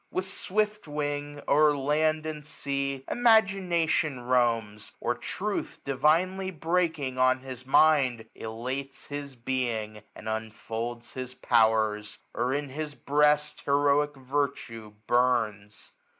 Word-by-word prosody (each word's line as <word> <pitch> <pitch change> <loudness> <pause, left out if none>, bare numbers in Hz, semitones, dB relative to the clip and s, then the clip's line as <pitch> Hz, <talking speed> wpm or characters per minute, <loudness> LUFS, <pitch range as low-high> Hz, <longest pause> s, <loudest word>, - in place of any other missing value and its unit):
With 185 - -2
swift 210 +1 -2
wing, 145 0 -3
' - - -31
O'er 150 0 +4
land 155 +3 +1
and 155 -1 -5
sea 140 -2 -3
imagination 190 - +2
roams; 115 -4 0
Or - - 0
truth, - - -4
divinely 165 +8 +2
breaking 160 -6 -1
on 130 0 +4
his 130 -1 -9
mind. 135 -6 +4
Elates 130 +5 -6
his 145 -2 -6
being, 115 -4 -2
and 110 - -10
unfolds 110 +2 -4
his 130 -1 -7
powers; 110 -3 +2
1335 - - -2
Or 125 +2 0
in 145 -1 -3
his 150 +1 -5
breast 150 +1 +2
heroic 145 +1 +2
virtue 130 -5 -3
burns. 115 -4 0
140 Hz, 120 wpm, -28 LUFS, 120-150 Hz, -, O'er